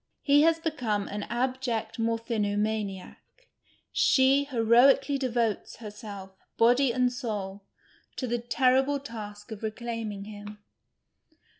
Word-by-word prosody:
He 290 Hz, 0 st, +5 dB
has 330 Hz, +1 st, +4 dB
become 250 Hz, -11 st, -2 dB
an 205 Hz, 0 st, -5 dB
abject 245 Hz, -2 st, -2 dB
mor|)hiiK)maiiiae; 215 Hz, -3 st, -2 dB, 0.7 s
she 275 Hz, +1 st, +4 dB
li<roir 240 Hz, +3 st, +6 dB
ally 280 Hz, +1 st, -2 dB
devotes 235 Hz, -6 st, -1 dB
lurself, 205 Hz, -3 st, -9 dB, 0.3 s
body 245 Hz, +3 st, +4 dB
and 250 Hz, +1 st, +1 dB
soul, 205 Hz, -6 st, -4 dB, 0.5 s
to 260 Hz, -, -3 dB
the 240 Hz, 0 st, -1 dB
ttrriblc 265 Hz, +3 st, +2 dB
t;isk 210 Hz, -4 st, -8 dB
of 220 Hz, -, -6 dB
rccliiiniing 220 Hz, -2 st, -5 dB
liiin. 210 Hz, 0 st, -9 dB
230 Hz, 110 wpm, -28 LUFS, 210-260 Hz, 0.7 s, li<roir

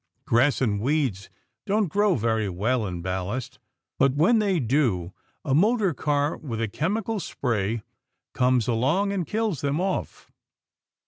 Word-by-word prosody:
Grass 130 Hz, +5 st, +3 dB
and 105 Hz, -5 st, +1 dB
weeds 130 Hz, -7 st, 0 dB, 0.4 s
don't 205 Hz, 0 st, +2 dB
grow 205 Hz, +3 st, +2 dB
very 110 Hz, -3 st, 0 dB
well 105 Hz, +5 st, 0 dB
in 90 Hz, -2 st, -5 dB
ballast, 105 Hz, +8 st, -4 dB, 0.4 s
but 135 Hz, 0 st, +3 dB
when 215 Hz, +10 st, +4 dB
they 195 Hz, -5 st, +1 dB
do 115 Hz, -, 0 dB, 0.3 s
a 135 Hz, -, 0 dB
motor 205 Hz, -, +3 dB
car 145 Hz, +1 st, 0 dB
with 120 Hz, -7 st, -5 dB
a 115 Hz, -, 0 dB
chemical 205 Hz, -, -2 dB
spray 115 Hz, -, -2 dB, 0.5 s
comes 125 Hz, -3 st, +2 dB
along 145 Hz, -, +1 dB
and 180 Hz, -6 st, -2 dB
kills 215 Hz, -, -1 dB
them 145 Hz, +2 st, 0 dB
off. 190 Hz, +1 st, -3 dB
135 Hz, 140 wpm, -25 LUFS, 115-180 Hz, 0.5 s, when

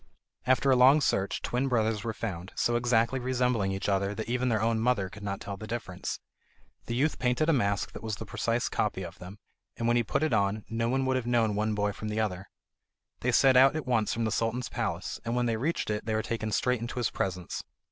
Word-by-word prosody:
After 130 Hz, +1 st, +4 dB
a -, -, +6 dB
long 130 Hz, +4 st, +7 dB
search 100 Hz, -8 st, 0 dB
twin 125 Hz, +3 st, 0 dB
brothers 110 Hz, -4 st, +1 dB
were 115 Hz, -, -2 dB
found, 95 Hz, -3 st, -5 dB
so 120 Hz, -, +1 dB
exactly 120 Hz, +1 st, +2 dB
resembling 125 Hz, -5 st, +1 dB
each 95 Hz, 0 st, -3 dB
other 100 Hz, 0 st, 0 dB
that 110 Hz, -, -4 dB
even 125 Hz, +1 st, 0 dB
their 110 Hz, -2 st, +2 dB
own 115 Hz, +1 st, +1 dB
mother 110 Hz, -5 st, +1 dB
could 105 Hz, -, -11 dB
not 100 Hz, -1 st, -3 dB
tell 100 Hz, -1 st, -6 dB
the 110 Hz, -, -8 dB
difference. 105 Hz, -5 st, -4 dB, 0.7 s
The 120 Hz, -, -2 dB
youth 145 Hz, +5 st, +1 dB
painted 125 Hz, +5 st, +1 dB
a -, -, +5 dB
mask 100 Hz, -7 st, 0 dB
that -, -, -9 dB
was 110 Hz, -2 st, -3 dB
the 110 Hz, -, -7 dB
precise 115 Hz, +5 st, -1 dB
copy 100 Hz, -3 st, -1 dB
of 90 Hz, +1 st, -9 dB
them, 90 Hz, +3 st, -9 dB, 0.4 s
and 115 Hz, -, -1 dB
when 120 Hz, 0 st, +3 dB
he -, -, +4 dB
had 115 Hz, -, -2 dB
put -, -, 0 dB
it 155 Hz, -, +1 dB
on, 100 Hz, 0 st, +1 dB
no 115 Hz, +1 st, -1 dB
one 135 Hz, +1 st, +1 dB
would 130 Hz, 0 st, +2 dB
have 125 Hz, -2 st, -3 dB
known 115 Hz, -3 st, +2 dB
one 105 Hz, +1 st, 0 dB
boy 105 Hz, 0 st, +1 dB
from 110 Hz, -, -7 dB
the 105 Hz, +1 st, -2 dB
other. 95 Hz, -3 st, -2 dB, 0.7 s
They 125 Hz, -, 0 dB
set 130 Hz, +2 st, +5 dB
out 135 Hz, +3 st, +6 dB
at 155 Hz, -, -3 dB
once 115 Hz, -4 st, +1 dB
for 115 Hz, -, -1 dB
the 110 Hz, -, 0 dB
Sultan's 115 Hz, +3 st, -1 dB
palace, -, -, -3 dB
and 115 Hz, +1 st, -2 dB
when 125 Hz, 0 st, +1 dB
they 115 Hz, -1 st, +1 dB
reached 145 Hz, -1 st, -1 dB
it, 105 Hz, 0 st, -2 dB
they 110 Hz, 0 st, -1 dB
were 110 Hz, -, 0 dB
taken 110 Hz, -2 st, -3 dB
straight 125 Hz, +3 st, +1 dB
into 120 Hz, +2 st, -5 dB
his 120 Hz, -2 st, 0 dB
presence. 90 Hz, -2 st, -3 dB
115 Hz, 245 wpm, -29 LUFS, 105-125 Hz, 0.7 s, long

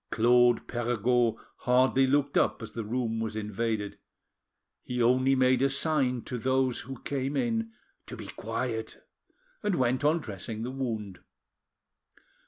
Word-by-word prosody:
Claude 120 Hz, +1 st, +4 dB
Perregaud 120 Hz, 0 st, +1 dB, 0.2 s
hardly 130 Hz, +1 st, +3 dB
looked 140 Hz, +1 st, +1 dB
up -, -, +2 dB
as 110 Hz, -, -7 dB
the 115 Hz, -, -4 dB
room 115 Hz, 0 st, -2 dB
was 110 Hz, -1 st, -3 dB
invaded; 105 Hz, 0 st, -3 dB, 0.8 s
he 125 Hz, 0 st, -4 dB
only 130 Hz, +3 st, +4 dB
made 130 Hz, -1 st, +3 dB
a 135 Hz, -, +4 dB
sign 135 Hz, -4 st, +1 dB
to 125 Hz, -, -5 dB
those—who 130 Hz, 0 st, -1 dB
came 140 Hz, 0 st, -2 dB
in 225 Hz, -, 0 dB, 0.4 s
to -, -, -8 dB
be -, -, -8 dB
quiet, -, -, -4 dB, 0.6 s
and 210 Hz, -4 st, 0 dB
went 125 Hz, -2 st, +1 dB
on 150 Hz, +3 st, +4 dB
dressing 110 Hz, -, -6 dB
the 125 Hz, -, -4 dB
wound. 110 Hz, -8 st, -4 dB
125 Hz, 135 wpm, -29 LUFS, 115-135 Hz, 0.8 s, Claude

